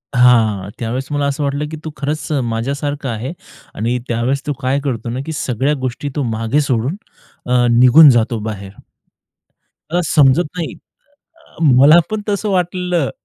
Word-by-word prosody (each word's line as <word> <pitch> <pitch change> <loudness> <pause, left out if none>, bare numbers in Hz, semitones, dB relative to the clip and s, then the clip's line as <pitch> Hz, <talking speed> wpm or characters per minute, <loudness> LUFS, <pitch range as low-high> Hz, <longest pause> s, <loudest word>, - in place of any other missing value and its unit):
हां. 110 -6 +3
त्यावेळेस 125 +3 -3
मला 145 -1 0
असं 140 +1 -2
वाटलं 140 +1 -2
की 160 - -6
तो 155 - -4
खरचं 150 +1 -3
अ, - - 0
माझ्यासारखा 140 +4 -3
आहे 115 +6 -4 0.4
आणि 120 +4 -1
त्यावेळेस 125 +5 -1
तो 145 - 0
काय 130 +2 0
करतो 120 -4 -3
ना 125 +2 -4
की 160 - -5
सगळ्या 135 +3 -1
गोष्टी 130 +3 -3
तो 145 - -1
मागे 115 +5 0
सोडून 130 +4 -1 0.5
अ, 125 -1 +2
निघून 125 +6 +7
जातो 120 -2 +1
बाहेर. 100 -3 -6 1.2
मला 175 +1 +1
समजत 145 +2 +4
नाही 165 - -3 0.9
अ - - -5
मला 150 +6 +7
पण 215 -1 -2
तसं 205 +1 -1
वाटलेलं 180 -4 -1
135 Hz, 160 wpm, -17 LUFS, 120-150 Hz, 1.2 s, निघून